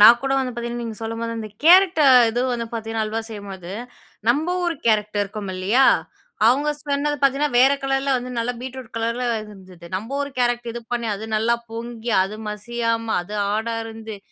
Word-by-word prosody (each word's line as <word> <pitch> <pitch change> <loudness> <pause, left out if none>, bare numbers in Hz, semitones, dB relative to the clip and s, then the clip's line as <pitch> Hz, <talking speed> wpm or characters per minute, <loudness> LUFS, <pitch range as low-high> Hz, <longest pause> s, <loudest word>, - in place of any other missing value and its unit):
நான் 230 +3 +9
கூட 270 0 0
வந்து 260 -2 -1
பார்த்தீங்கன்னா, 235 0 -4
நீங்க 225 -2 -5
சொல்லும்போது 230 +1 -3
அந்த 215 -1 -5 0.2
கேரட்ட 360 -1 +7 0.3
இது 240 +2 -1
வந்து 235 -1 -2
பார்த்தீங்கன்னா, 225 -1 -2
அல்வா 220 +1 -2
செய்யும்போது, 195 -5 -8 0.6
நம்ம 310 +9 +2
ஊரு 345 - 0
கேரட் 210 -2 +2
இருக்கும் 200 0 -5
இல்லயா! 205 +9 +3 0.6
அவுங்க 285 +6 +3
சொன்னது 290 +1 0
பார்த்தீங்கன்னா, 275 +1 +2
வேற 270 +2 +6
கலர்ல, 270 0 0
வந்து 250 +1 -6
நல்லா 235 +2 0
பீட்ரூட் 260 -2 -7
கலர்ல 230 +2 -1 0.2
இருந்தது. 185 -4 -13
நம்ம 225 +8 -5
ஊரு 285 0 -2
கேரட் 240 -1 +1
இது 240 - -5
பண்ணி 235 -1 -1
அது 205 +2 -7
நல்லா 225 +2 +2 0.2
பொங்கி, 230 0 -5
அது 200 +3 -4
மசியாம, 230 +2 -2 0.2
அது 175 - -11
ஹார்டா 220 +3 -1
இருந்து, 225 -1 -8
230 Hz, 170 wpm, -22 LUFS, 215-255 Hz, 0.6 s, நான்